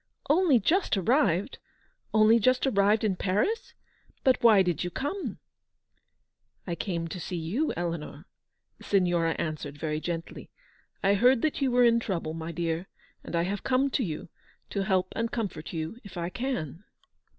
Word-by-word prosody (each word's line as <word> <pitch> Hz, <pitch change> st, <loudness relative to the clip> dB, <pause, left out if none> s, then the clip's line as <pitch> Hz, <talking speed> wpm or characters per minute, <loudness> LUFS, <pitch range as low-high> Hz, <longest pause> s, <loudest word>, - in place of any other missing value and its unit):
" -, -, -23 dB
Only 315 Hz, -6 st, +4 dB
just 320 Hz, -, +1 dB
arrived! 195 Hz, -, +1 dB, 0.5 s
Only 220 Hz, +1 st, +5 dB
just 255 Hz, +4 st, +3 dB
arrived 210 Hz, -3 st, +3 dB
in 205 Hz, -4 st, +1 dB
Paris! 210 Hz, -, -1 dB, 0.5 s
But 260 Hz, -1 st, +3 dB
why 215 Hz, -5 st, +7 dB
did 175 Hz, -3 st, -1 dB
you 175 Hz, -, -2 dB
come 290 Hz, -, -4 dB, 0.4 s
?" -, -, -49 dB
" -, -, -48 dB
I 175 Hz, -, -3 dB
came 170 Hz, 0 st, -3 dB
to 175 Hz, +3 st, -6 dB
see 180 Hz, -, -5 dB
you, 200 Hz, -, -1 dB
Eleanor," 170 Hz, -3 st, -4 dB, 0.5 s
the -, -, -14 dB
Signora 175 Hz, -4 st, +2 dB
an 155 Hz, -2 st, -2 dB
swered, 145 Hz, -1 st, -8 dB
very 155 Hz, 0 st, -2 dB
gently. 165 Hz, 0 st, -5 dB, 0.5 s
"I 195 Hz, +1 st, +4 dB
heard 245 Hz, +4 st, +4 dB
that 310 Hz, -2 st, 0 dB
you 270 Hz, -, +2 dB
were 245 Hz, 0 st, +4 dB
in 235 Hz, -1 st, +5 dB
trouble, 170 Hz, -8 st, -3 dB
my 165 Hz, +1 st, -5 dB
dear, 170 Hz, +1 st, -2 dB, 0.4 s
and -, -, -5 dB
I 170 Hz, -, +2 dB
have 195 Hz, +3 st, -2 dB
come 265 Hz, +2 st, +1 dB
to 260 Hz, -, +1 dB
you 160 Hz, -7 st, -4 dB
j -, -, -15 dB, 0.4 s
to 200 Hz, -, -1 dB
help 185 Hz, -2 st, +1 dB
and 230 Hz, 0 st, -1 dB
comfort 195 Hz, -9 st, -4 dB
you 165 Hz, +7 st, -5 dB
if 200 Hz, -4 st, -11 dB
I 170 Hz, 0 st, -2 dB
can." 180 Hz, -, -4 dB
195 Hz, 180 wpm, -28 LUFS, 170-240 Hz, 0.5 s, why